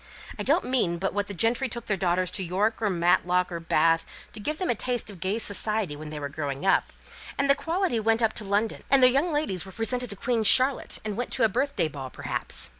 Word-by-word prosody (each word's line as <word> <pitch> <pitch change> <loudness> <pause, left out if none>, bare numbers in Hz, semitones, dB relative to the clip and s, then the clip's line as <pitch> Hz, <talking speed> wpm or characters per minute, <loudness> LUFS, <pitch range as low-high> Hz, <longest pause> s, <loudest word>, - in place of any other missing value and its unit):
I - - -1
don't - - +2
mean 230 -10 +1
but 190 +3 -2
what 205 0 -1
the 205 - -6
gentry 235 +7 +1
took 235 0 -5
their 210 - 0
daughters 180 -1 0
to 190 - -2
York, 200 +6 -1
or 215 - +1
Matlock, 180 0 +2
or 170 - -4
Bath, 165 0 +2 0.3
to - - -8
give 300 +9 -3
them 365 -5 0
a - - +2
taste 240 -1 -3
of 190 - -13
gay 190 +5 -1
society 210 -5 +1
when 150 +1 -8
they 150 -1 -6
were 145 - -3
growing 140 +1 -5
up; 195 - +2 0.5
and 280 - +1
the 275 - +6
quality 335 - -1
went 225 +1 +1
up 220 - +2
to 215 - -5
London, 205 +2 -1
and 270 -1 +5
their 255 - +7
young 285 +7 +1
ladies 295 - -1
were 190 - -11
presented 245 +3 -2
to 200 - -4
Queen 235 +3 -1
Charlotte, 255 +5 +4
and 210 -1 -3
went 245 - -3
to 255 - +1
a 225 - +5
birthday 280 - 0
ball, 140 -3 -7
perhaps. - - -2
210 Hz, 245 wpm, -26 LUFS, 180-245 Hz, 0.5 s, their